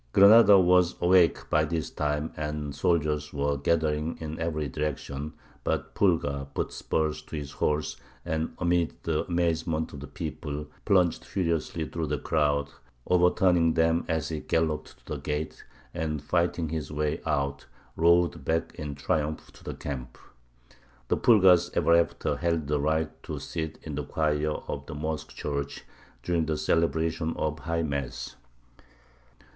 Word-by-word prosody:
Granada 100 +1 +8
was 90 -1 +4
awake 90 -1 +4
by 75 - +4
this 80 0 -2
time, 75 +1 -2
and 75 -1 -3
soldiers 75 -2 0
were 70 0 0
gathering 75 +2 0
in 80 -1 -5
every 80 -3 -1
direction; 75 +1 -4 0.3
but - - -2
Pulgar 75 -7 +1
put - - -2
spurs 80 -1 -1
to - - -9
his 70 -2 -5
horse, 75 +1 -1 0.3
and, 80 0 -1
amid 85 -2 +1
the 80 -2 0
amazement 80 -2 0
of 70 - -7
the 70 - -8
people, 75 -1 -5 0.2
plunged 90 -5 +3
furiously 85 -3 -1
through 80 -2 -3
the 75 +1 -1
crowd, 70 -1 +1 0.3
overturning 90 -2 +3
them 80 0 +3
as 80 -2 -1
he 80 -2 -3
galloped 80 -1 -1
to - - -29
the - - -4
gate, 75 +1 -4 0.3
and, 75 -2 -3
fighting 85 +1 0
his 75 -2 -4
way 75 0 -1
out, 70 -1 -1 0.3
rode 85 +1 +3
back 80 0 -1
in 75 -2 -6
triumph 75 +2 -2
to - - -17
the - - -5
camp. 65 -3 -6 0.9
The - - +2
Pulgars 95 -7 +6
ever 85 - +4
after 85 0 +1
held 85 -3 0
the 75 +1 0
right 80 +2 -1
to - - -5
sit 80 -1 -4
in 75 - -6
the 75 +1 -2
choir 75 +1 0 0.2
of 70 0 -5
the 80 - -6
mosque 75 +1 -3
church 70 -1 -4 0.4
during 85 0 0
the 80 -1 0
celebration 80 0 0
of 75 -1 -1
High 85 +2 -1
Mass. 70 -4 -4
80 Hz, 150 wpm, -28 LUFS, 75-85 Hz, 0.9 s, Granada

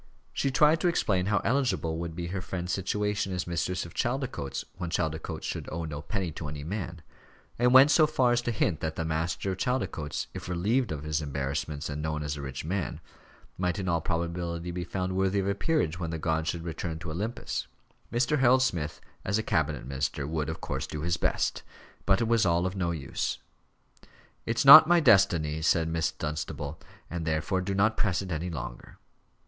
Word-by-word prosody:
She 140 - 0
tried 150 +4 +4
to - - +3
explain 95 - +1
how 105 -1 +2
eligible 115 -11 0
would 85 -1 -5
be 85 0 -4
her 95 +1 -3
friend's 90 -1 -4
situation 105 +1 -1
as 90 -1 -2
mistress 85 +1 -2
of 85 - -11
Chaldicotes, 125 - -2
when 85 -2 -3
Chaldicotes 80 -2 -2
should - - -4
owe 85 +1 -3
no 75 -2 -5
penny 95 0 -3
to 75 0 -6
any 75 0 -6
man: 90 -1 -5 0.6
and 125 +1 +4
went 135 +3 +8
so 155 -1 +6
far 130 -5 +2
as 120 0 +2
to 120 - -2
hint 85 -7 0
that 80 0 -3
the 80 - -2
master 80 +4 -1
of 95 - -5
Chaldicotes, 105 - -2
if - - -7
relieved 105 +7 +1
of 75 -2 -4
his 75 0 -1
embarrassments 70 +1 -3
and 75 0 -4
known 75 -1 -2
as 75 0 -2
a 70 - -6
rich 65 +1 -6
man, 95 +2 -2 0.6
might 90 -2 0
in 95 - -3
all 85 -2 +1
probability 85 0 -2
be 90 0 -3
found 95 +1 -3
worthy 95 +1 +1
of 95 0 0
a 100 - +2
peerage 100 - 0
when 85 -2 -3
the 80 - -3
gods 80 +1 0
should 85 -2 -3
return 85 0 -4
to 85 -1 -6
Olympus. 105 +9 -3 0.4
Mr. 125 +5 +1
Harold 130 0 +5
Smith, 85 - -2 0.2
as 100 +2 0
a 110 - -1
cabinet 75 - 0
minister, 70 +1 -2
would, 75 -1 -2
of - - -5
course, - - -3
do 75 - -5
his 85 +1 0
best. - - 0 0.5
But 100 +3 +4
it 115 - +1
was 115 -1 +3
all 85 -1 +2
of 95 +1 -2
no 90 -3 0
use. 75 -5 -2 1.1
"It's 115 +3 +1
not 155 +4 +12
my 175 0 +5
destiny," 85 - +4
said 80 0 +2
Miss 80 -1 0
Dunstable, 75 0 -4 0.3
"and 85 -1 -4
therefore 80 +4 0
do 95 +1 -2
not 110 +3 +2
press 95 -2 +1
it 95 - -7
any 85 +2 -2
longer." 60 -7 -7
85 Hz, 200 wpm, -28 LUFS, 80-100 Hz, 1.1 s, not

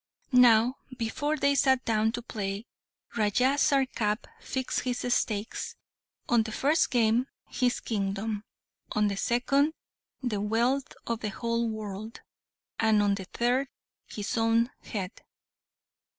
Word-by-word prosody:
Now, 245 0 +6 0.2
before 290 +6 -1
they 280 -1 +3
sat 265 -2 +3
down 220 -1 +2
to 240 - -4
play, 205 -2 -4 0.5
Raja 240 +5 +3
Sarkap 255 -7 +1 0.2
fixed 260 -1 -2
his 245 -1 -1
stakes, 210 0 -2 0.5
on 235 -1 +4
the 220 0 -4
first 290 +8 +2
game, 240 0 +3 0.2
his 250 -2 +1
kingdom; 205 0 -2 0.5
on 210 -1 +2
the 200 - -2
second, 275 +7 +2 0.5
the 215 -5 -1
wealth 240 +6 +1
of 230 -1 -2
the 215 - -3
whole 230 +2 -1
world; 215 0 -6 0.6
and, 220 -2 +4
on 200 -1 +3
the 195 -1 -4
third, 245 +7 0 0.4
his 210 +2 -3
own 230 +2 +3
head. 195 -4 -5
230 Hz, 125 wpm, -28 LUFS, 210-250 Hz, 0.6 s, Now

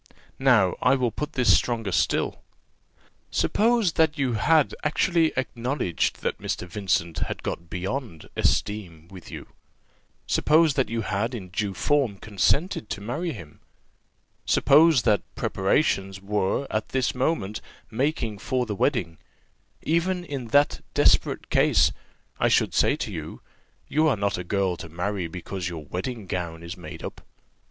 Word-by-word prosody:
Now 120 -9 +4
I 130 +2 +4
will 125 -3 0
put 150 +5 -5
this 125 -3 +4
stronger 115 -5 -1
still. - - 0 0.9
Suppose 225 -4 +2
that 160 -2 +2
you 135 -4 0
had 150 +7 +3
actually 165 +1 +2
acknowledged 125 - -1
that - - -1
Mr. 90 - -3
Vincent 85 -3 -1
had - - -4
got 85 0 -5
beyond 95 - -4
esteem 85 -6 -1
with 95 -3 -12
you; - - -8 0.8
suppose 155 0 +3
that 135 -2 0
you 115 0 -1
had 110 +4 -2
in 95 -5 -7
due 100 +1 -2
form 140 -9 +1
consented 110 - 0
to - - -4
marry 125 - -3
him; 85 - -11 0.8
suppose 150 -2 +5
that 105 -4 +3
preparations 95 -2 0
were 100 +5 -1
at 110 0 -2
this 130 -1 0
moment 125 -6 -1 0.3
making 115 -4 -1
for 125 +3 -1
the 110 - -3
wedding; 95 - 0 0.6
even 175 +2 0
in 135 -6 -5
that 145 +5 +2
desperate - - +3
case - - +4 0.5
I - - +3
should - - +2
say - - +3
to - - -4
you, - - -7 0.5
you 155 +1 +2
are 140 - +2
not 100 -2 -1
a - - -4
girl 95 -1 0
to 80 - -8
marry 90 +2 -2
because 90 +1 -5
your 80 -3 -7
wedding 105 - -5
gown 85 -2 -4
is 85 +2 -6
made 90 - -10
up. - - -7
110 Hz, 145 wpm, -25 LUFS, 95-140 Hz, 0.9 s, suppose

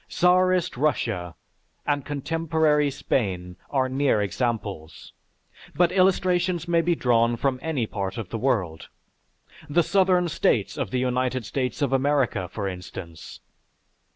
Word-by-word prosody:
Czarist 180 -1 +2
Russia, 115 - -1 0.5
and 145 -1 0
contemporary 150 0 +1
Spain 95 -9 -2
are 130 -2 +1
near 130 -3 +1
examples, 105 -6 -3 0.6
but 175 -1 +3
illustrations 185 -2 +2
may 170 -1 +3
be 170 +1 +1
drawn 120 -3 +2
from 130 +1 0
any 150 -8 -1
part 100 -2 -4
of 110 -6 -5
the 115 - -3
world; 100 -11 -1 0.8
the 170 +4 +3
Southern 185 -1 +3
States 160 - +1
of - - -3
the 130 - -2
United 125 -1 -1
States 130 +3 -2
of 135 -1 0
America, 130 -9 +1
for 100 -3 -3
instance. 90 -3 -8
130 Hz, 125 wpm, -25 LUFS, 110-165 Hz, 0.8 s, but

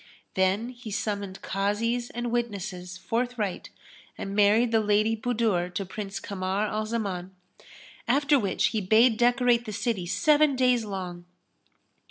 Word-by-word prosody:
Then 190 +5 +1
he 240 -2 -10
summoned 200 -2 -3
Kazis 230 +5 -1
and 240 0 -4
witnesses 195 -6 -3
forthright 230 -4 -2 0.5
and 195 0 -5
married 215 +3 +4
the 225 - +4
Lady 215 +1 +2
Budur 220 -6 0
to 195 - -2
Prince 195 +1 -6
Kamar 195 +1 -2
al 215 0 -2
Zaman; 190 -5 -3 0.7
after 285 +3 +3
which 200 -5 +1
he 220 - -1
bade 220 +5 +5
decorate 245 0 +3
the 215 - -5
city 210 -4 -2
seven 300 - +3
days 250 -3 +2
long. 180 -3 -6
215 Hz, 135 wpm, -27 LUFS, 195-240 Hz, 0.7 s, bade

